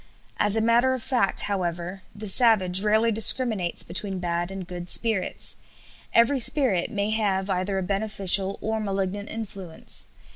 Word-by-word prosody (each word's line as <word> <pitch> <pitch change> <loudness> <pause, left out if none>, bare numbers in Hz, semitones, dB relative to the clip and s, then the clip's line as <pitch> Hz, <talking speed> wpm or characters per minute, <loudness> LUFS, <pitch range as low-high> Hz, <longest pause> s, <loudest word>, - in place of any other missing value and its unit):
As 210 +1 +2
a - - +1
matter 240 +3 +2
of 250 - -8
fact, 245 -7 +1
however, 180 -1 -4
the 210 +1 -8
savage 190 -4 +3
rarely 220 +2 +1
discriminates 220 -4 +4
between 190 +2 -5
bad 175 0 -3
and 195 -1 -7
good 175 -1 -8
spirits. 220 -5 +1 0.5
Every 235 +4 +3
spirit 240 - +2
may 205 -2 -3
have 200 -3 -1
either 185 +2 -2
a 190 - -2
beneficial 195 -1 +1
or 220 0 -2
malignant 200 0 -4
influence. 195 -7 -6
200 Hz, 145 wpm, -24 LUFS, 185-220 Hz, 0.5 s, discriminates